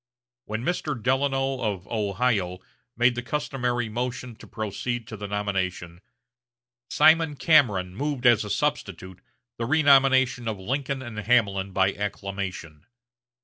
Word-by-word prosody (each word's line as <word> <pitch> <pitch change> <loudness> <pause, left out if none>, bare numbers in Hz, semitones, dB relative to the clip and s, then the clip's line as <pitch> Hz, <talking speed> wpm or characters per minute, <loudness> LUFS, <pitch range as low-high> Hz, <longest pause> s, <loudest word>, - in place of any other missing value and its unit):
When 110 +2 -4
Mr. 150 -4 -2
Delano 135 +2 0
of 100 -4 -3
Ohio 100 -3 0 0.4
made 120 +1 +4
the 120 - -4
customary 125 -3 -2
motion 125 +1 -4
to - - -14
proceed 115 +2 -4
to 110 - -6
the 105 -1 -6
nomination, 95 -4 -3 0.9
Simon 160 -2 +4
Cameron 105 - +3
moved 140 +1 -3
as 120 -3 +5
a 105 - -7
substitute 95 - -3 0.4
the 115 - -2
renomination 135 -4 +4
of 110 -2 -2
Lincoln 135 +6 -3
and 115 -3 -7
Hamlin 100 -4 +1
by 95 +1 +2
acclamation. 100 -6 -5
115 Hz, 125 wpm, -25 LUFS, 100-130 Hz, 0.9 s, as